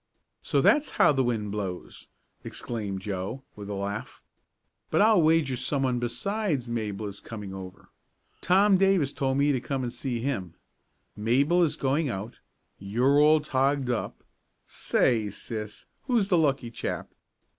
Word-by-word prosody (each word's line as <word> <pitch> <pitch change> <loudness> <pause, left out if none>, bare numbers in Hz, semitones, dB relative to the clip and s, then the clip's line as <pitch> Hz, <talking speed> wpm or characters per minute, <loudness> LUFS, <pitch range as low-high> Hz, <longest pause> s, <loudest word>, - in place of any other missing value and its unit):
So - - +1
that's 295 0 +4
how - - +6
the 135 -2 +1
wind 110 -4 -1
blows!" 95 -4 -5 0.4
exclaimed 105 -5 -5
Joe, 100 +6 -4
with 105 -1 -8
a 100 - -3
laugh. 100 +2 -5 0.7
"But - - +1
I'll 215 -3 +5
wager 155 -4 +3
someone 130 0 0
besides 140 - -2
Mabel 110 -3 -3
is 100 -1 -6
coming 105 -4 -8
over. 95 -1 -10 0.5
Tom 195 +2 +4
Davis 190 -7 +2
told 135 -1 0
me 145 +1 +3
to 130 -3 0
come 135 +1 -3
and 120 -1 -3
see 125 -1 -3
him, 110 - -3 0.6
Mabel 135 +11 +2
is 165 -4 +2
going 140 +2 0
out, 110 +2 -6 0.4
you're 125 +9 +2
all 155 +1 +5
togged 135 -2 +1
up 120 - -4 0.4
say, 110 -4 +1
sis, 105 +1 -6 0.2
who's 230 -6 +2
the 180 - +4
lucky 135 -6 +1
chap?" - - -4
125 Hz, 145 wpm, -27 LUFS, 105-145 Hz, 0.7 s, how